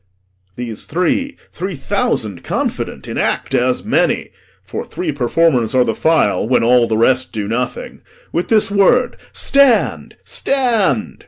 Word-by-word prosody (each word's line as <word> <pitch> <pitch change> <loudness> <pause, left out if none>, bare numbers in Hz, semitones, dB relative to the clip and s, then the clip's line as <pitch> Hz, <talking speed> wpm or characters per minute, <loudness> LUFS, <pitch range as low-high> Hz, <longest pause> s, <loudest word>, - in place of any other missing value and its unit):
These 115 -3 -6
three, 265 - -1
Three 185 0 -5
thousand 135 - -2
confident, - - -3
in - - -4
act - - -1
as 125 +1 +1
many - - 0 0.3
For - - -5
three - - -4
performers 130 -2 +1
are 125 - +5
the 115 - -1
file 110 - +1
when 125 - +3
all 120 0 +4
The 110 - 0
rest 130 +3 +2
do 105 -2 -3
nothing 120 +3 -4 0.3
with 170 - -1
this 215 -2 +2
word 205 +5 +3 0.2
'Stand, 275 -4 +2
stand!' 225 - 0
135 Hz, 140 wpm, -17 LUFS, -, 0.3 s, are